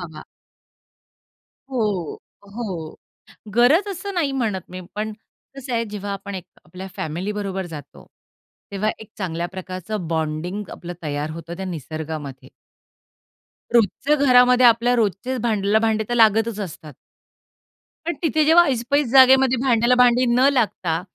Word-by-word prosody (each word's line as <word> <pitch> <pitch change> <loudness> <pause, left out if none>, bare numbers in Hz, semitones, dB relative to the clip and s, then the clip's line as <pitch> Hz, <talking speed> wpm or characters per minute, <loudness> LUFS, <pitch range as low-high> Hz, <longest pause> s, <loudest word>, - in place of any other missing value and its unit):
हवा. 160 -3 -9 1.5
हो, 210 - -2 0.4
हो, 185 -9 -5 0.6
गरज 295 - +4
असं 395 +2 -6
नाही 320 -6 0
म्हणत 220 -9 -2
मी, 185 0 -7
पण 215 +1 -3 0.4
कसं 265 -2 -6
आहे 230 0 0
जेव्हा 205 -1 -5
आपण 200 0 -7
एक 180 - -7 0.2
आपल्या 180 +4 -9
फॅमिलीबरोबर 190 +3 -4
जातो, 155 -5 -11 0.7
तेव्हा 200 +2 -1
एक 220 - -12
चांगल्याप्रकारचं 185 +1 -5
बॉन्डिंग 160 +5 -3
आपलं 175 0 -8
तयार 145 0 -3
होतं 165 +1 -8
त्या 190 - -5
निसर्गामध्ये. 155 -5 -6 1.2
रोजचं 270 +6 +2
घरामध्ये 250 -1 +6
आपल्या 240 +1 +4
रोजचे 230 +4 -1
भांड्याला 210 -1 +2
भांडे 220 -1 +1
तर - - 0
लागतच 225 -1 +3
असतात 160 -5 -7 1.1
पण 340 - -2
तिथे 310 -1 +2
जेव्हा 330 +2 +7
ऐसपैस 265 +2 0
जागेमध्ये 265 -1 +6
भांड्याला 245 -1 +3
भांडी 250 0 +4
न 250 +3 +4
लागता, 195 -10 0
210 Hz, 125 wpm, -22 LUFS, 175-250 Hz, 1.5 s, जेव्हा